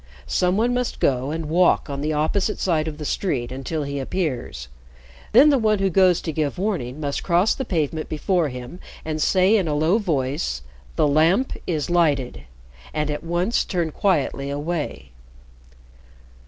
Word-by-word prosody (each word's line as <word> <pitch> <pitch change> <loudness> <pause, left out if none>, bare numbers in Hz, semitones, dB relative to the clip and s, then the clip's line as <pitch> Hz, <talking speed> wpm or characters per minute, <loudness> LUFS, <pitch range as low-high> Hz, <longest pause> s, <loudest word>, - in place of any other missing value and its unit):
Some 180 +1 +1
one 235 +3 +2
must 250 -1 -2
go 130 0 +1
and 160 +1 -3
walk 175 +3 +3
on 140 -1 -4
the 155 +1 -1
opposite 160 +7 0
side 160 -4 0
of 150 -1 -5
the 150 - -6
street 135 -9 -2
until 135 +4 -3
he 140 0 -4
appears. 130 - -3 0.6
Then 275 +6 +7
the 275 - +3
one 215 -2 +2
who 195 -1 0
goes 185 -1 +4
to 160 - -3
give 155 +1 -2
warning 170 - -2
must 145 -2 -2
cross 180 +4 +2
the 265 - -4
pavement 155 -2 -2
before 165 +1 0
him 125 +6 -8 0.3
and 155 -1 -3
say 190 +6 +4
in 190 -6 +1
a 150 - 0
low 160 +8 +2
voice, 135 - -2 0.3
'The - - +3
Lamp 165 - +3
is 160 -1 -1
lighted!' 145 -8 +1 0.5
and 150 -1 0
at 150 0 -4
once 175 +6 0
turn 170 -4 -2
quietly 145 -6 0
away." 145 - -4
160 Hz, 170 wpm, -22 LUFS, 145-185 Hz, 0.6 s, Then